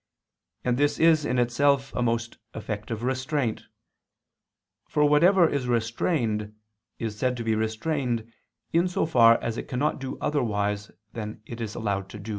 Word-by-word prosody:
And 125 -1 +1
this 145 0 +2
is 160 -2 +5
in 125 - 0
itself 135 +3 +2
a - - -1
most 115 -1 -1 0.2
effective 110 +1 -5
restraint; 130 -1 -1 1.2
for 150 - +2
whatever 170 +5 +5
is 140 -5 -2
restrained, 115 -2 -1 0.4
is 110 -2 -4
said 125 -1 0
to 115 - -4
be 110 -1 +1
restrained 115 +1 -2 0.4
in 170 +2 +3
so 180 - 0
far 115 -7 +6
as 115 0 -2
it - - -7
cannot 140 +4 -1
do 135 -1 -5
otherwise 105 -7 -1 0.2
than 110 -1 -6
it 115 0 -8
is 110 -2 -4
allowed 100 -3 -2
to. 100 0 -9
120 Hz, 150 wpm, -26 LUFS, 110-145 Hz, 1.2 s, far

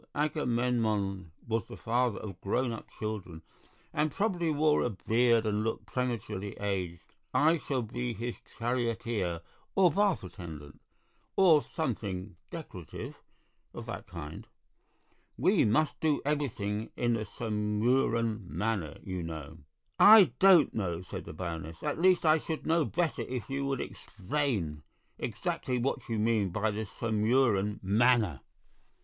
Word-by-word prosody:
Agamemnon 115 - 0 0.2
was 115 -2 -1
the - - -9
father 120 -1 +1
of 95 -4 -8
grown 120 +5 0
up 115 - -7
children, 95 -7 -5 0.5
and 155 +1 +1
probably 180 -3 0
wore 150 0 +3
a - - +1
beard 115 +2 +2
and 105 0 0
looked 115 - -2
prematurely 110 -6 -3
aged. 95 -4 -3 0.2
I 160 +3 +5
shall 135 -4 -2
be 120 +2 -3
his 120 +3 -4 0.2
charioteer 115 -7 -1 0.3
or 185 -3 +5
bath 200 - +2
attendant, 80 -5 -9 0.5
or 170 -6 +6
something 105 - -4
decorative 120 - -8 0.5
of - - -6
that - - -6
kind. - - -8 0.9
We - - +4
must 150 +8 +2
do 155 -2 +2
everything 110 -8 -1
in 120 0 +2
the 110 -2 -1
Sumurun 110 0 0
manner, 100 -9 -2
you 95 -2 -4
know." 80 -3 -7 0.4
"I 205 - +9
don't 185 -6 +7
know," 90 -5 -2
said - - -7
the - - -7
Baroness; 80 -1 -6
"at 150 +1 -1
least, 180 -1 +4
I 155 0 +5
should 160 0 -5
know 165 -1 +3
better 170 -2 -1
if 125 -1 -5
you 140 0 -1
would 135 -2 -1
explain 100 - -3 0.4
exactly 125 -1 -2
what 125 +1 -2
you 115 - 0
mean 105 -2 +2
by 110 +4 0
the 110 +2 -3
Sumurun 110 -1 +1
manner." 105 - +3
115 Hz, 135 wpm, -30 LUFS, 100-140 Hz, 0.9 s, I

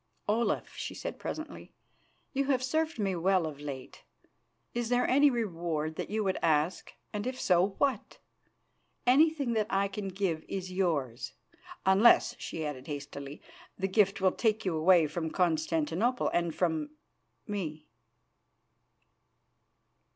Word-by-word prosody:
"Olaf," 225 +3 0
she - - -5
said - - -6
presently, 315 0 -6 0.6
"you 275 0 +1
have 265 -2 +1
served 315 +4 0
me 195 -4 0
well 185 0 +2
of 150 -3 -6
late. 135 -3 -7 0.7
Is 235 -1 -2
there 245 0 +2
any 285 +3 +5
reward 170 - -2
that - - -4
you 215 +1 0
would 190 -2 0
ask, 160 +2 +1 0.2
and 210 +2 -3
if 255 0 -4
so, 185 +2 +3
what? 270 -7 0 0.9
Anything 280 0 +4
that 215 -2 +1
I 200 -2 +2
can 200 0 -5
give 185 -4 -2
is 185 -1 -4
yours, 155 -11 -1 0.5
unless," 195 +5 +5
she 160 -1 -4
added 135 -3 -5
hastily, 140 -1 -7 0.3
"the 190 - 0
gift 195 0 +3
will 190 -1 +4
take 220 -2 0
you 180 -3 0
away 165 +1 +5
from 160 +2 -3
Constantinople 165 +7 +1
and 170 -2 0
from 160 -4 0 0.6
me." 160 -7 -4
190 Hz, 135 wpm, -30 LUFS, 160-225 Hz, 0.9 s, any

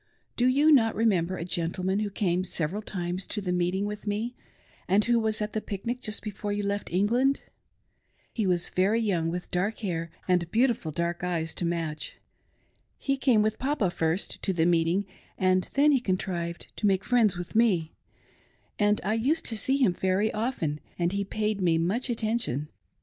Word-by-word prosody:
Do 245 - +3
you 285 +5 +5
not 225 -6 +5
rememfcer 185 -5 +1
a 165 - -3
gentleman 185 +3 -1
who 210 -1 -1
came 185 -3 0
several 180 +2 -2
times 180 -2 -4
to 210 - -3
the 185 -3 -2
meeting 180 +2 0
with 210 +1 -6
me, 215 +4 -1 0.5
and 200 +3 +3
who 240 0 +3
was 220 -1 0
at 210 - -5
the 215 - -1
pic 200 0 -6
nic 245 +2 -2
just 215 -3 -4
before 205 -1 -4
you 205 0 -1
left 200 0 -2
England? 240 +9 +2 0.9
He 215 -4 0
was 175 -2 +1
very 200 +5 +2
young, 180 -7 0
with 175 +1 -5
dark 195 +5 0
hair 165 -3 -2 0.2
and 180 -2 +2
beautiful 230 -7 +1
dark 170 +2 -2
eyes 165 -3 -1
to 175 - -3
match. 165 -3 -3 0.8
He 275 - 0
came 255 -6 +3
with 215 0 -1
Papa 260 -9 0
first 165 +3 -1
to 190 - 0
the 165 -2 +2
meeting, 170 +3 +2 0.3
and 185 0 +2
then 290 +2 +5
he 275 - +4
contrived 180 -5 -3
to 210 - +1
make 190 -1 +2
friends 225 -7 +3
with 175 -1 -6
me, 190 -9 +3 0.9
and 210 0 +3
I 210 - +1
used 275 +9 +1
to 225 - -2
see 265 +6 +2
him 250 -10 +3
very 190 +4 +1
often, 215 - -2 0.2
and 175 0 +1
he 200 +1 -1
paid 210 0 -2
me 170 -3 +3
much 195 +11 0
attention. 220 - -1
200 Hz, 185 wpm, -27 LUFS, 175-220 Hz, 0.9 s, you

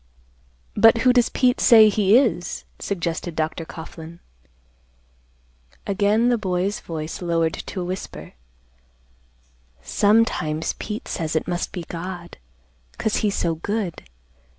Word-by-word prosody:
"But 225 0 +6
who 250 - +6
does 245 -1 +3
Pete 250 -1 +2
say 220 -2 +8
he 210 +1 +4
is?" 225 -9 0
suggested 170 -3 -3
Dr. 160 +1 -2
Coughlan. 160 +1 -10 1.7
Again 210 +4 +2
the 240 -2 +2
boy's 190 0 -1
voice 160 0 -6
lowered 165 -2 0
to 185 - -6
a - - -3
whisper, 185 +2 -7 1.5
"Sometimes 165 - +1
Pete 210 0 -5
says 160 -1 -3
it 160 - 0
must 175 0 -2
be 175 - -5
God, 175 +1 -7 0.6
'cause 220 - 0
he's 205 -2 0
so 170 -1 0
good. 190 +2 -3
185 Hz, 120 wpm, -22 LUFS, 165-215 Hz, 1.7 s, say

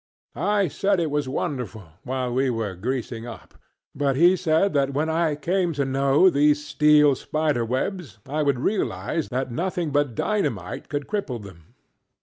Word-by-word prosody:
I 205 -2 +1
said 195 +4 0
it 160 -3 -1
was 145 -2 -1
wonderful, 125 -5 -3 0.2
while 130 -1 -3
we 130 +1 +1
were 115 -5 -2
greasing 115 +3 -4
up, 115 - -10 0.4
but 140 -2 0
he 175 +6 +5
said 175 +2 +1
that 140 -1 +1
when 155 +3 0
I 160 -2 +1
came 175 +3 0
to 140 -1 -1
know 135 +5 +3
these 150 -2 +3
steel 150 -1 +5
spider 150 -2 -1
webs 130 - -3
I 150 +3 -1
would 140 -3 +2
realize 165 - -1
that 130 0 -2
nothing 175 +2 -2
but 145 -4 0
dynamite 110 - -2
could 145 -2 -3
cripple 195 - -3
them. 85 -5 -14
145 Hz, 160 wpm, -24 LUFS, 125-160 Hz, 0.4 s, he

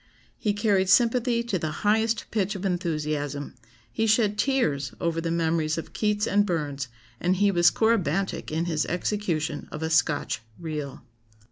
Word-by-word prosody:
He 210 - -1
carried 200 -3 +2
sympathy 235 +2 +3
to 210 -6 -1
the 155 - -2 0.2
highest 220 +2 +2
pitch 205 -2 0
of 195 0 -5
enthusiasm; 150 -5 -2 0.4
he 225 - 0
shed 215 -1 +3
tears 160 - 0
over 165 -1 -1
the 165 - -2
memories 160 -1 0
of 165 - -6
Keats 210 -1 +1
and 205 -1 +3
Burns, 145 -7 -2 0.3
and 180 +2 +1
he 200 +1 +3
was 175 -2 +5
corybantic 195 -5 0
in 160 +2 0
his 160 -3 -1
execution 170 -5 -2
of 150 - -5
a 160 - -2
Scotch 145 -6 +1 0.2
'reel. 150 -6 -5
175 Hz, 155 wpm, -26 LUFS, 155-210 Hz, 0.4 s, was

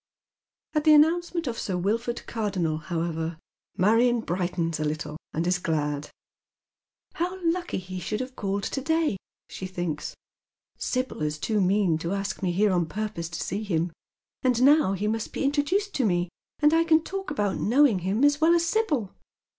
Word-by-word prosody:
At 305 -2 +1
the 310 -1 +7
announcement 335 +2 +3
of 240 -3 -3
Sir 185 -3 -2
Wilford 230 +6 -1
Cardonnel 190 -8 -1
however, 165 0 -3 0.4
Marion 230 +5 +4
brightens 175 -4 -2
a - - 0
little, 150 0 -3 0.2
and 165 +2 -1
is 180 0 +1
glad. 150 -3 -1 0.5
" - - -49
How 360 +3 -2
lucky 350 +1 0
he 185 0 -6
should 210 +4 -3
have 255 0 -5
called 200 0 -2
to 270 - -2
day! 320 -6 +1 0.2
" - - -68
she 185 - -5
thinks, 175 -5 -4 0.3
" - - -55
Sibyl 255 -8 -2
is 150 0 -1
too 210 +6 0
mean 185 -3 +2
to 170 +3 -2
ask 200 +1 -3
me 185 -2 +1
here 200 +3 +3
on 175 -3 +1
purpose 200 -3 -4
to 175 - -4
see 200 +3 -3
him, 175 -5 -1 0.5
and 250 -1 +2
now 285 -7 +5
he 200 +2 -2
must 225 +1 -2
be - - -2
introduced 305 +9 +1
to 270 - 0
me 175 -2 0 0.3
and 300 +1 +4
I 330 0 +5
can 320 -1 +4
talk 385 +2 -5
about 205 -9 -1
knowing 250 -3 +4
iiim 195 +9 +1
as 290 +1 +3
well 335 +2 +6
as 340 0 +2
Sibyl. 325 - 0
210 Hz, 185 wpm, -26 LUFS, 175-290 Hz, 0.5 s, the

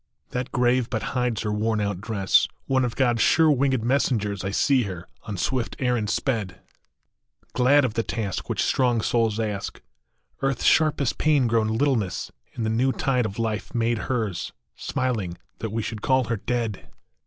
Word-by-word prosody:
That 125 0 -3
grave 125 0 +2
but 110 - -2
hides 125 -4 0
her 105 -1 -1
worn 110 +1 0
out 100 -3 -2
dress, 100 -3 +2 0.2
One 130 -1 +2
of 120 -2 -2
God 120 -3 +2
s - - +2
sure 160 +5 +5
winged 135 -3 +1
messengers 115 -6 0
I 95 - -1
see 130 +6 +3
her, 90 -3 -7 0.2
on 105 -3 -5
swift 125 +5 -1
errand 125 -5 0
sped, 115 +5 +1
I6O - - 0
NON 100 - -5
OMNIS - - -12
MORIAR. - - -27 0.2
Glad 145 -2 +6
of 120 - -2
the 115 - +1
task 105 -4 -4
which - - 0
strong 125 -3 +2
souls 115 -1 +1
ask, 105 -3 -3 0.6
Earth 135 -2 0
s - - -2
sharpest 150 -5 +3
pain 150 -4 +3
grown 115 -2 +2
littleness 110 -5 0 0.2
In 115 - -4
the 110 - 0
new 125 +4 +2
tide 125 -4 0
of 100 - -8
life 110 -1 -3
made 115 -1 +1
hers, 110 -8 -2 0.2
Smiling 105 -9 -2 0.2
that 110 - -3
we 110 +1 -2
should 105 -1 -5
call 130 +2 +3
her 115 - 0
dead 115 -2 -3
115 Hz, 190 wpm, -24 LUFS, 105-130 Hz, 0.6 s, Glad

